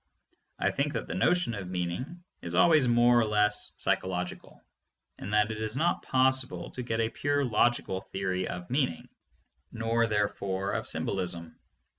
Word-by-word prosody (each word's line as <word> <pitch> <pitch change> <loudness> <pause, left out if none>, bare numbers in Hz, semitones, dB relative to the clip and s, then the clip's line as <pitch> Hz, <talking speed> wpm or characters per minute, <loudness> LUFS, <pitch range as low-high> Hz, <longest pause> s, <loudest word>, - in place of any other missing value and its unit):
I - - +1
think 145 +1 -1
that - - -3
the - - -6
notion 175 -8 +1
of 100 -4 -5
meaning 90 - -4 0.2
is - - -5
always 155 -6 +5
more 120 0 +5
or 115 - +3
less 105 -1 +3
psychological, 90 -1 -2 0.6
and 100 - -6
that 105 0 +2
it 110 - -5
is 110 +3 -3
not 170 +4 +1
possible 130 0 +1
to 125 - -6
get 115 -2 -2
a 110 -1 +1
pure 145 +4 0
logical 115 -4 +1
theory 95 -1 -3
of 90 +3 -7
meaning, 130 - -1 0.6
nor 115 0 0
therefore 100 -2 -1
of - - -2
symbolism. 85 -3 -3
110 Hz, 155 wpm, -29 LUFS, 95-130 Hz, 0.6 s, always